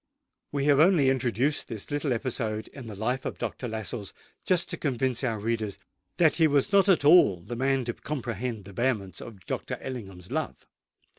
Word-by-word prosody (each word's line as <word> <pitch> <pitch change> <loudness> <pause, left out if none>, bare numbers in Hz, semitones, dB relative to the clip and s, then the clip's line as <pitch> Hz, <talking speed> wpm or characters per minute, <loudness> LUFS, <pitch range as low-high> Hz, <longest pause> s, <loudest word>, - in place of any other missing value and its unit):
We 140 -1 -1
have 145 -1 +5
only 155 -5 +5
introduced 130 +3 0
this 110 0 -6
little 145 -1 -1
episode 115 -3 -2
in 130 -4 -10
the 105 - -7
life 125 +6 -1
of - - -4
Dr. 130 - -4
Lascelles, 110 -2 -5 0.3
just 175 -2 +3
to - - -3
convince 130 -3 -1
our 115 -4 0
readers 110 -1 -2 0.4
that 160 -3 +4
he 160 -2 +5
was 145 +2 +2
not 200 0 +5
at 175 -6 +4
all 145 - +7
the 105 +8 -7
man 135 +1 +1
to 120 - -2
comprehend 120 -6 -4
the 100 - -11
vehemence 105 -7 -1
of 115 -4 -9
Lord - - -4
Ellingham's 95 -9 -8
love. - - -3
125 Hz, 180 wpm, -27 LUFS, 110-140 Hz, 0.4 s, all